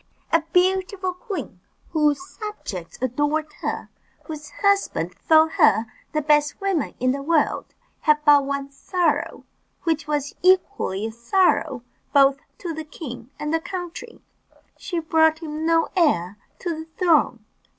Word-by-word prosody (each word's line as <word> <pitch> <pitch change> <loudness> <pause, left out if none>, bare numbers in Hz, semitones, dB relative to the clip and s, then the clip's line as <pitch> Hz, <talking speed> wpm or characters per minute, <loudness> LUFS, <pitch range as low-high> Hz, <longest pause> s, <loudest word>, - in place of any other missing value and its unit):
A 330 - +5
beautiful 375 +1 +1
queen, 360 - -6 0.3
whose 300 -3 +2
subjects 390 - -7
adored 295 +4 0
her, - - -3 0.3
and - - -33
whose 300 -2 -7
husband 395 - +1
thought 315 - +4
her 300 - +4 0.3
the 305 -1 -1
best 295 -1 +2
woman 390 -7 -1
in 255 +1 +2
the 275 +1 -3
world, 310 +1 0 0.2
had 305 -2 +4
but 290 -2 +7
one 280 0 -3
sorrow, 340 +3 -1 0.4
which 325 -3 0
was 290 -2 -1
equally 365 - +2
a 225 - -3
sorrow 250 - +1 0.3
both 275 -1 +5 0.2
to 345 -3 -5
the 315 0 -5
king 255 -6 -9
and 300 +1 -3
the 325 - +3
country 360 +6 -7 0.6
she 355 - -5
brought 320 -1 +3
him 315 0 -4
no 330 0 +3
heir 205 - +2 0.2
to 345 -2 -3
the 320 0 -7
throne. 305 - +2
310 Hz, 140 wpm, -23 LUFS, 280-355 Hz, 0.6 s, but